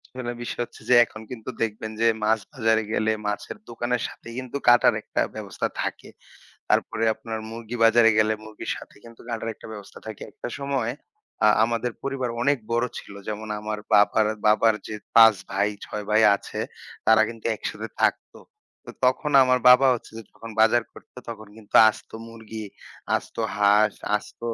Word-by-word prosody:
আসলে 120 -2 -4
বিষয় 120 - -4
হচ্ছে - - -18
যে 125 - +6
এখন 110 - -12
কিন্তু 115 -1 -7
দেখবেন 110 0 -2
যে, 115 - +4 0.2
মাছ 110 +1 +3
বাজারে 110 -3 +2
গেলে 110 +1 +1 0.2
মাছের 105 - -4
দোকানের 120 +1 -2
সাথে - - -13
কিন্তু 130 +1 -4
কাটার 120 0 +6
একটা - - -2
ব্যবস্থা - - -3
থাকে। - - -5 0.6
তারপরে 115 0 +1
আপনার 110 0 -6
মুরগি 115 +1 -7
বাজারে 115 0 +6
গেলে 110 0 +3
মুরগির 110 -1 -6
সাথে - - -13
কিন্তু 115 -1 -14
কাটার 115 0 -3
একটা - - -13
ব্যবস্থা 100 -2 -11
থাকে। 110 -2 -8
একটা - - -7
সময় 135 -4 -1 0.5
আ - - +7 0.2
আমাদের 120 +1 -1
পরিবার 135 -3 -2
অনেক 140 +3 +2
বড় 120 +1 +2
ছিল। - - -12
যেমন 110 0 -5
আমার 105 0 -4
বাবার, 105 +1 +5 0.2
বাবার 110 +1 +4
যে 110 - -5 0.2
৫ 115 -1 +8 0.2
ভাই, 100 +2 +1 0.2
৬ 105 0 -5
ভাই 110 +1 +4
আছে, - - -8 0.5
তারা 110 0 +6
কিন্তু 115 -1 -11
একসাথে 100 - -5
থাকত। - - +1 0.5
তো - - -10 0.2
তখন 130 +4 +1
আমার 125 0 +2
বাবা 125 +2 +7
হচ্ছে 120 - -7
যে 115 - -8
যখন 115 - -11
বাজার 115 +2 +4
করত, - - -17 0.2
তখন 110 -2 -8
কিন্তু 105 -2 -9
আস্ত 110 - -9 0.2
মুরগি, 110 -1 -8 0.5
আস্ত - - -5 0.2
হাস। 105 +1 +4 0.2
আস্ত 105 - -6
115 Hz, 170 wpm, -24 LUFS, 110-120 Hz, 0.6 s, ৫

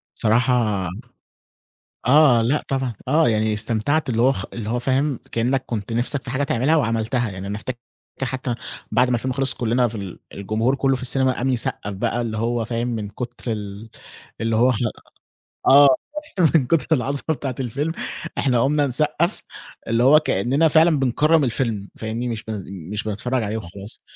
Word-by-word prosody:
صراحة 110 -4 +1 1.2
آه، 130 -4 +6
لأ 135 +6 +1
طبعًا، 130 -3 -1
آه، 155 +2 +4
يعني 110 -1 +1
استمتعت 115 +9 0
اللي 115 -2 +1
هو 130 +2 +5
خ 95 - -5
اللي 110 -2 -5
هو 120 - 0
فاهم، 135 +2 0
كإنّك 130 +3 0
كنت 115 -1 -4
نِفْسك 125 +4 0
في 125 - -6
حاجة 135 +2 -1
تعملها 135 +4 +2
وعملتها، 115 -3 0
يعني 95 0 -7
أنا 100 +1 -3
افتك 120 +3 -5 0.4
حتّى 130 -1 -2 0.4
بعد 125 - +3
ما 120 - +3
الفيلم 130 +3 -2
خلص 135 0 +2
كُلّنا 120 +1 +1
في 115 - -9
ال 100 -5 -6 0.2
الجمهور 110 +6 0
كُلّه 135 -1 +1
في 130 - -7
السينما 130 +1 +2
قام 125 +1 -2
يصقَّف 110 -4 -2
بقى 115 +4 -1
اللي 115 -2 -3
هو 115 +1 0
فاهم، 115 +2 -2
من 110 -4 -3
كُتر 120 +2 -5
ال 105 +1 -7 0.5
اللي 115 -1 0
هو 125 +3 +4
خ - - -1 0.9
آه، 140 +1 +8 0.7
من 130 -6 +4
كُتر 165 0 +1
العظمة 140 +1 -1
بتاعة 135 -3 -4
الفيلم 140 +5 -2 0.5
إحنا 125 -4 +2
قُمنا 145 +2 +2
نصقَّف 150 - 0 0.4
اللي 115 +1 +2
هو 150 +4 +7
كإنّنا 140 +4 +1
فعلًا 160 0 +4
بنكرّم 150 +4 +3
الفيلم 115 -5 -1
فاهمني، 115 +2 -3
مش 115 -1 -4
بن 105 -4 -5 0.3
مش 105 - -2
بنتفرّج 110 +3 -2
عليه 105 +2 -2
وخلاص. 100 +1 -9
120 Hz, 170 wpm, -22 LUFS, 110-135 Hz, 1.2 s, آه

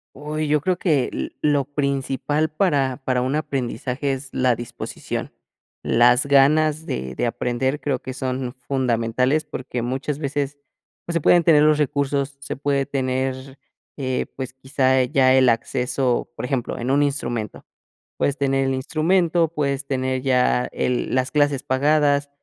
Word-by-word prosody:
Uy, 150 +1 -3
yo 150 0 +3
creo 180 +4 0
que 150 -8 +1
lo - - -3 0.2
lo 145 -1 +2
principal 140 +2 -1
para 145 -6 +1
para 125 -1 +1
un 130 +3 -1
aprendizaje 135 -1 -2
es 135 +1 -4
la 125 -2 +2
disposición, 120 0 -6 0.5
las 120 +2 +4
ganas 150 +3 +3
de 65 0 -4
de - - -1
aprender 125 +4 -1
creo 135 -5 -1
que 130 - -7
son 130 -1 -3
fundamentales, 125 +2 +1
porque 130 -4 -5
muchas 135 +4 -3
veces, 145 -1 -2 0.5
pues, 170 - -4
se 170 - 0
pueden 175 +3 +5
tener 150 -3 +6
los 155 0 +4
recursos, 140 -1 -1
se 140 - -5
puede 140 -1 0
tener, 130 0 -2 0.4
eh, 130 -3 -2
pues, 130 -2 -5
quizá 130 0 +1
ya 130 +1 +3
el 130 -1 +5
acceso, 125 +2 0
por - - -6
ejemplo, 125 -1 -2
en 125 +2 -2
un 145 +1 +3
instrumento. 120 -7 -3 0.5
Puedes 140 0 0
tener 135 -1 +1
el 135 - 0
instrumento, 165 +4 +1
puedes 140 -3 -2
tener 130 -1 -1
ya 125 -1 +2
el 125 -1 -1
las 130 +1 0
clases 145 -2 +1
pagadas, 145 +1 +2
135 Hz, 155 wpm, -22 LUFS, 130-145 Hz, 0.5 s, tener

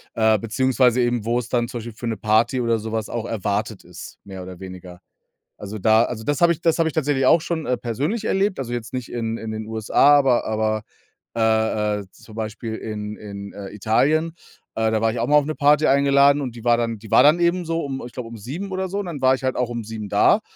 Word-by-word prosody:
äh, 110 -1 +3
beziehungsweise 125 +3 +2
eben 120 -3 0
wo's 120 0 -1
dann 120 -1 0
zum 125 0 -6
Beispiel 115 0 -7
für 120 +2 -6
'ne 115 -1 -2
Party 110 +4 +2
oder 115 -2 +1
so 110 +1 -6
was 110 -1 -2
auch 115 -1 -4
erwartet 105 -1 -2
ist, 90 0 -11
mehr 95 -2 -9
oder 90 -1 -9
weniger. 90 -2 -10 0.6
Also 105 +1 -7
da 110 +3 +4
also 115 -2 -4
das 145 +2 -1
habe 170 -1 +5
ich 170 - -7
das 165 -1 +1
habe 160 - +3
ich - - -5
tatsächlich 145 -3 0
auch 165 - +6
schon, 160 -1 -3
äh, 125 - 0
persönlich 145 - -3
erlebt, 195 -1 0
also 125 -3 -4
jetzt 120 -2 -5
nicht 125 -2 -4
in 115 -1 -2
in 110 -1 -6
den 110 0 -5
USA, 110 +5 +2
aber 130 -4 +2
aber, 110 0 -1 0.5
äh 110 -2 +1
äh, - - -8
zum 110 - -16
Beispiel 110 +1 -5
in 105 -1 -6
in, 100 -1 -9
äh, 100 -1 -8
Italien. 140 +11 +1 0.5
Äh, 110 0 +2
da 110 0 0
war 115 0 +2
ich 120 - -4
auch 115 - 0
mal 150 +3 +4
auf 145 -1 +4
'ne 155 - -2
Party 150 +1 +3
eingeladen 140 +1 +4
und 125 -4 -5
die 115 - -10
war 120 -1 +4
dann 115 -1 -2
die 110 0 -13
war - - +6
dann 155 +4 +5
eben 175 +1 +1
so 165 0 -2
um, 135 -1 -5
ich 120 - -11
glaube, 120 -1 -6
um 115 - -9
7:00 145 - -6
oder 190 0 -2
so 200 - -3
und 205 - -3
dann 155 -6 -6
war 130 0 +5
ich 130 - -5
halt 130 -1 -1
auch 125 -1 -1
um 120 -1 -4
7:00 110 -1 -6
da, - - +4
115 Hz, 250 wpm, -22 LUFS, 110-140 Hz, 0.6 s, auch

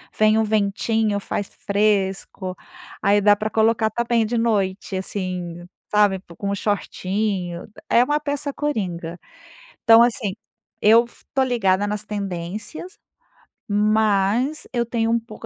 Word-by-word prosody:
vem 215 0 +4
um 220 - +3
ventinho, 215 0 0
faz 200 0 -3
fresco, 195 -2 -1 0.5
aí 205 0 +4
dá 205 0 +5
para 215 +1 -3
colocar 220 0 +2
também 235 0 0
de 240 +2 -1
noite, 205 -4 0
assim, 180 -3 -4 0.2
sabe, 205 -2 +3 0.2
com 200 0 -2
o - - 0
shortinho 195 -2 -2 0.2
É 240 - +5
uma 295 +3 +1
peça 285 -1 -3
coringa. 180 - -3 0.7
Então 230 0 +8
assim, 235 -4 +1 0.5
eu 225 +3 +6
f - - -19
estou 265 -1 +1
ligada 205 -6 +1
nas 210 0 -3
tendências, 205 - -6 0.7
mas 215 +6 +1
eu 240 -1 +1
tenho 230 -1 -1
um 235 - +3
pouco, 225 0 -11
210 Hz, 130 wpm, -22 LUFS, 195-230 Hz, 0.7 s, Então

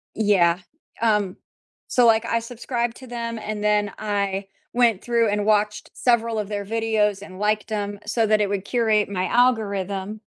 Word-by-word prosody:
Yeah, 185 -5 +3 0.4
um, 210 -4 +1 0.5
so, 245 -1 +4
like, 225 0 +4
I 230 0 +1
subscribed 235 0 -3
to 260 - -11
them 230 -1 -4
and 215 -1 -5
then 210 -1 +2
I 200 -2 -1 0.3
went 235 -4 +3
through 235 -2 +2
and 205 0 0
watched 210 0 +1
several 230 -2 +1
of 210 -2 -3
their 205 -1 -3
videos 215 -2 0
and 185 -2 -10
liked 210 +1 0
'em 205 -1 -3
so 225 +1 +1
that 215 0 +3
it 205 - +2
would 200 -1 -2
curate 220 -2 +2
my 185 -2 -1
algorithm 205 -4 0
210 Hz, 170 wpm, -23 LUFS, 205-230 Hz, 0.5 s, so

